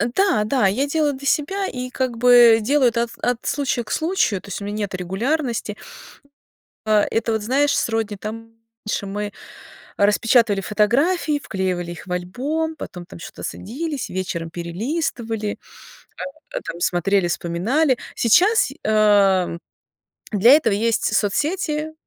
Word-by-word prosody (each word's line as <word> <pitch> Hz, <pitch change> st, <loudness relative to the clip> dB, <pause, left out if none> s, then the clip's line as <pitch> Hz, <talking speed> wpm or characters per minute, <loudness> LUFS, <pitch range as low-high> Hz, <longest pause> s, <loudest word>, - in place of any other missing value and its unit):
Да, 385 Hz, -, +3 dB
да, 250 Hz, -1 st, +1 dB
я 255 Hz, +9 st, 0 dB
делаю 300 Hz, -1 st, +1 dB
для 275 Hz, +1 st, -6 dB
себя 385 Hz, +8 st, 0 dB
и, 250 Hz, 0 st, -5 dB
как 255 Hz, -3 st, -2 dB
бы, 240 Hz, -1 st, +7 dB
делаю 265 Hz, +2 st, +3 dB
от 235 Hz, 0 st, -1 dB
от 245 Hz, -1 st, +1 dB
случая 275 Hz, -4 st, -1 dB
к 210 Hz, -, -10 dB
случаю. 315 Hz, -, 0 dB
То -, -, -15 dB
есть 200 Hz, -, -5 dB
у -, -, -5 dB
меня 205 Hz, +1 st, -4 dB
нету 200 Hz, -3 st, -3 dB
регулярности. 230 Hz, -, -2 dB, 1.1 s
А, 210 Hz, -1 st, +4 dB
это 225 Hz, 0 st, 0 dB
вот, 220 Hz, -, -1 dB
знаешь, 280 Hz, +6 st, +2 dB
сродни, 225 Hz, -2 st, -1 dB
там 225 Hz, +3 st, -7 dB, 0.4 s
раньше 205 Hz, -, -2 dB
мы 205 Hz, +1 st, -4 dB, 0.7 s
распечатывали 210 Hz, 0 st, +3 dB
фотографии, 280 Hz, -, +1 dB
вклеивали 180 Hz, -2 st, -2 dB
их 175 Hz, -, -10 dB
в 180 Hz, -, -8 dB
альбом, 275 Hz, -, -2 dB
потом 180 Hz, -, -8 dB
там 170 Hz, -, -12 dB
чё-то -, -, -10 dB
садились, 285 Hz, -, -5 dB
вечером 170 Hz, -3 st, -4 dB
перелистывали, 220 Hz, -, -3 dB, 1.1 s
там, 170 Hz, -, -6 dB
смотрели, 180 Hz, +2 st, +1 dB
вспоминали. 230 Hz, -, 0 dB, 0.2 s
Сейчас, 365 Hz, -, +4 dB, 0.2 s
а, 205 Hz, -4 st, +4 dB, 0.8 s
для 215 Hz, +5 st, +6 dB
этого 255 Hz, -9 st, +4 dB
есть 225 Hz, +2 st, 0 dB
соцсети, 305 Hz, -, -1 dB
225 Hz, 135 wpm, -21 LUFS, 200-280 Hz, 1.1 s, бы